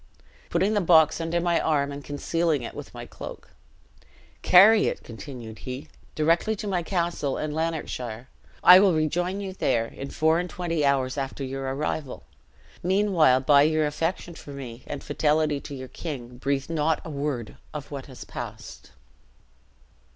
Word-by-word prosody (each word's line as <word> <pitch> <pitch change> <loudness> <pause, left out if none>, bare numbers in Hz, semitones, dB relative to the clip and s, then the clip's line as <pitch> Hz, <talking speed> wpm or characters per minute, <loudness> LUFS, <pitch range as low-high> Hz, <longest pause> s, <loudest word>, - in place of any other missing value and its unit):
Putting 200 +3 +1
the 205 - +2
box 160 -2 +5
under 165 +1 0
my 170 -1 +2
arm 145 -2 +1
and 140 0 -7
concealing 155 0 -1
it - - -6
with - - -9
my - - -8
cloak - - -10 0.9
'Carry 210 +4 +7
it,' - - -3
continued 115 -2 -9
he, 130 +2 -7 0.3
'directly 165 +7 +2
to 210 +1 -6
my 185 -3 0
castle 170 -5 -1
in 155 - -3
Lanarkshire. 130 -7 -3 0.4
I 180 +1 +10
will 190 -3 +4
rejoin 175 +5 0
you 190 -1 -5
there, 115 -10 +1
in 135 +4 -8
four 160 0 +2
and 180 0 -3
twenty 170 -4 -2
hours 135 -1 +1
after 135 0 -4
your 135 0 -3
arrival. 145 -1 -3 0.6
Meanwhile, 180 -8 +3
by 140 +1 +5
your 155 +1 +3
affection 165 +4 -2
for 155 - -12
me 130 -4 -8
and 145 - -6
fidelity 150 -1 +1
to 140 - -8
your 130 -1 -7
king, 125 -6 -7
breathe 135 0 -1
not 160 -1 +1
a 160 - -6
word 140 -6 -3
of 150 -1 -7
what 140 -2 -6
has 130 -3 -10
passed.' - - -8
150 Hz, 160 wpm, -26 LUFS, 135-170 Hz, 0.9 s, I